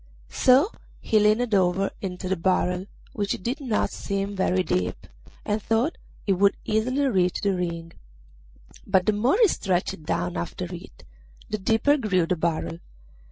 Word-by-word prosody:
So 270 - +4 0.3
he 215 - +2
leaned 215 +2 +2
over 190 0 +2
into 185 -1 -4
the 190 - +1
barrel, 180 +1 0 0.3
which 200 -2 -2
did 260 +8 -2
not 240 -6 0
seem 200 0 -3
very 185 -1 +1
deep, 90 - -2 0.4
and 210 +1 -1
thought 230 +9 0 0.3
he 195 - +3
would 200 +2 +3
easily 250 +6 +1
reach 185 -8 +1
the 200 -2 +1
ring; 170 -2 -4 0.9
but 190 -2 +3
the 215 - +3
more 240 - +2
he 455 - +7
stretched 185 - -1
down 90 - -2
after 85 - -4
it - - -11 0.5
the 215 - -1
deeper 225 +9 +3
grew 195 - +1
the 180 - 0
barrel. 155 - -2
195 Hz, 155 wpm, -25 LUFS, 180-220 Hz, 0.9 s, he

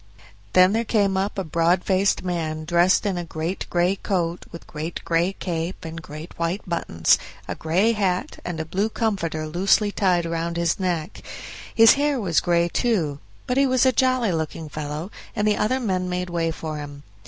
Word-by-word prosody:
Then 185 +2 +6
there 230 +1 +1
came 205 -3 +1
up 195 +2 -1
a 195 - -1
broad 170 +2 +1
faced 195 0 +2
man, 160 -3 -3
dressed 175 +4 +3
in 190 -3 0
a - - -3
great 165 +3 -4
gray 175 +2 +2
coat 175 -4 -2
with 170 - -10
great 155 +2 -5
gray 170 +3 +1
cape 170 -1 -4
and 165 0 -6
great 155 +2 -10
white 170 +5 -2
buttons, 85 - +2 0.3
a - - -2
gray 185 +8 +1
hat, 195 -5 -1
and 175 -2 -4
a 160 - -2
blue 195 +7 -1
comforter 185 -9 -1
loosely 195 +6 +2
tied 180 -4 +1
round 165 0 -2
his 170 +1 0
neck; 175 -4 -2 0.5
his 225 0 +8
hair 290 -2 +1
was 180 -7 +2
gray, 170 0 +2
too; 170 - 0 0.3
but 250 - -1
he 275 0 +4
was 255 0 +3
a 260 - +5
jolly 255 -4 +2
looking 160 -1 -3
fellow, 155 +5 -5 0.2
and 210 - +1
the 210 - +3
other 255 +5 +1
men 185 -6 -1
made 180 0 -3
way 165 -1 0
for 160 -1 -5
him. 145 -1 -8
175 Hz, 190 wpm, -23 LUFS, 165-200 Hz, 0.5 s, his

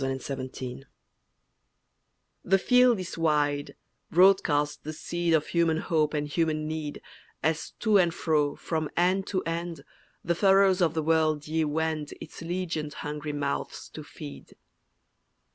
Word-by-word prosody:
RONDEAU—SEED 135 0 -4 0.3
TIME 135 - -18 1.6
THE 195 +2 +4
field 250 +1 +4
is 180 -2 -6
wide, 145 -3 +1 0.3
broadcast 165 -5 +3
the 155 - -5
seed 170 +1 0
Of 155 - +1
human 165 -2 +2
hope 155 -2 0
and 150 0 -1
human 155 0 0
need, 155 -2 -5 0.4
As, 160 +1 -1
to 215 -3 +4
and 175 -2 +3
fro, 150 -3 +1
from 155 -2 -3
end 185 +3 +2
to 185 -2 -1
end, 165 -2 -4 0.4
The 170 - +1
furrows 195 +1 +4
of 165 -2 +2
the 160 - 0
world 155 -2 +2
ye 160 +1 +1
wend 155 0 -2
Its 160 - -10
legioned 165 -3 -3
hungry 150 0 -4
mouths 140 -1 -3
to - - -9
feed. 70 -1 -11
160 Hz, 140 wpm, -27 LUFS, 150-175 Hz, 1.6 s, THE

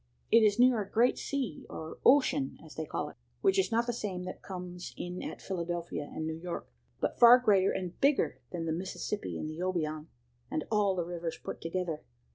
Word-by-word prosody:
It 230 - +8
is 210 -2 +4
near 245 -2 +5
a 200 - -6
great 235 +4 +3
sea, 260 - -3
or 160 0 -7
ocean 275 0 +4
as - - -12
they - - -4
call - - -3
it, - - -16 0.2
which 390 0 +4
is 380 - +1
not 230 +1 +2
the 240 - -1
same 195 -6 -3
that 185 - -7
comes 180 -2 -7
in 180 +1 -5
at - - -6
Philadelphia 170 -4 -3
and 160 - -4
New 160 0 -3
York, 175 -1 -5 0.3
but - - -1
far 240 +1 +10
greater 205 -6 +4
and 180 -2 -4
bigger 170 - +2
than 170 -2 -3
the 160 - -1
Mississippi 190 +4 -3
and - - -4
the 155 +1 -6
Obion, 155 -4 -1 0.4
and 155 - -1
all 205 -3 +3
the 175 -2 -1
rivers 170 -1 -4
put - - -7
together. 165 -1 -2
185 Hz, 205 wpm, -31 LUFS, 170-230 Hz, 0.4 s, far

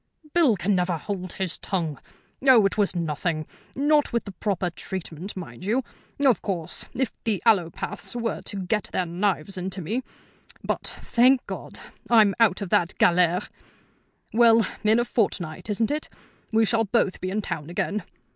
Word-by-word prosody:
"Bill 315 -10 +5
can 185 +4 +1
never 180 -2 +1
hold 185 +1 -4
his 185 -3 -2
tongue. 165 -7 -2 0.5
Oh, 240 -6 +8
it 195 - +1
was 205 -3 +1
nothing; 160 -1 -1 0.3
not 295 +2 +3
with 235 -1 0
the 200 - -8
proper 190 -2 -2
treatment, 185 +1 -6
mind 140 -9 -8
you. 230 +7 +1 0.4
Of 265 -8 +4
course, 175 -6 -4
if 260 -1 0
the 215 -4 0
allopaths 195 -1 +1
were 230 -3 -2
to 195 -2 -4
get 210 +3 -1
their 185 - 0
knives 185 +1 -1
into 185 +1 -4
me 215 +9 -2 0.6
but, - - -2 0.2
thank 250 +2 +4
God! - - -7 0.3
I'm 215 -4 +6
out 205 -4 +3
of 195 - -6
that 175 +1 +2
galère. 180 0 +3 0.9
Well, 230 -1 +6 0.2
in 215 +1 +5
a 240 - +2
fortnight, 195 -7 -2
isn't 215 +3 +1
it? 300 +1 -3 0.4
We 225 0 +4
shall 225 +1 +2
both 200 -3 +1
be 185 - -2
in 205 +2 -2
town 150 -4 -4
again. 205 +4 -1
195 Hz, 165 wpm, -25 LUFS, 180-225 Hz, 0.9 s, Oh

